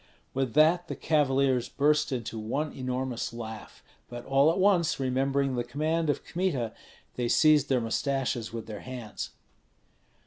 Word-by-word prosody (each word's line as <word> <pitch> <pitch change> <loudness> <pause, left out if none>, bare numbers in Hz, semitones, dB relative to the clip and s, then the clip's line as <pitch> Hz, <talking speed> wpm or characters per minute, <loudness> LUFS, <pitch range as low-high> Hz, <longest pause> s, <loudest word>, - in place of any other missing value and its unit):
With 130 -3 -1
that 165 +3 +4
the - - -4
cavaliers 135 -4 +1
burst 150 +1 +2
into 115 -3 -3
one 140 +8 -2
enormous 130 -2 -3
laugh; 110 -2 -8 0.3
but 120 0 -8
all 135 +3 +4
at - - -2
once 185 -6 +3
remembering 135 +1 0
the 120 -1 -1
command 155 +6 -1
of 145 - -1
Kmita, 160 -11 -1 0.4
they 120 -1 0
seized 150 -1 +4
their 130 -2 +2
mustaches 120 0 -1
with 115 -1 -6
their 105 -2 -7
hands. 125 -4 -6
135 Hz, 145 wpm, -28 LUFS, 120-150 Hz, 0.4 s, that